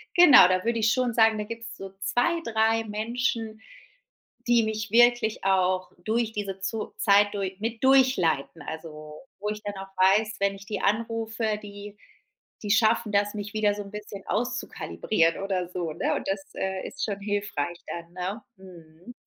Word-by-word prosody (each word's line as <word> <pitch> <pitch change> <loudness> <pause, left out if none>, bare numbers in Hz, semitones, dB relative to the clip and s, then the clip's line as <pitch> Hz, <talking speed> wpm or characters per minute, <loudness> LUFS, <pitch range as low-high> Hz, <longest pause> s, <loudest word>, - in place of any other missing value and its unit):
genau, 340 - +9
da 185 0 +1
würde 230 0 0
ich 220 -1 +3
schon 255 -2 0
sagen, 225 -1 +4
da 210 - -2
gibt's 230 +1 -8
so 195 -2 -9
2, 245 +12 +1
3, 225 0 +2
Menschen, 220 0 -2 0.9
die 235 -1 +4
mich 215 -1 -3
wirklich 240 -1 +4
auch 185 -1 +1
durch 225 +1 0
diese 200 -3 -4
Zo 215 +3 -4
Zeit 205 0 +4
dur 195 - -1
mit 225 +2 -4
durchleiten. 255 - +3
Also, 155 -1 -8 0.2
wo 210 +1 -3
ich 210 0 -4
dann 205 -1 -5
auch 195 0 -8
weiß, 205 +4 +3
wenn 200 0 +1
ich 195 0 -13
die 210 - -4
anrufe, 225 0 -1
die 205 0 -10 0.7
die 205 - -1
schaffen 220 0 +3
das, 205 0 +2
mich 210 +1 -6
wieder 215 -1 +2
so 205 - -5
'n 200 - -12
bisschen 210 -2 -8
auszukalibrieren 215 -7 -1
oder 185 -3 -2
so, 175 -3 -4
ne? 170 - -1
Und - - -4
das, 195 0 -2
äh, 190 -1 -3
ist 280 - -4
schon 200 -2 -4
hilfreich 200 -5 -3
dann, 170 0 -7
ne? 185 +5 -4 0.2
Mhm. 175 +2 -14
210 Hz, 170 wpm, -26 LUFS, 195-225 Hz, 0.9 s, genau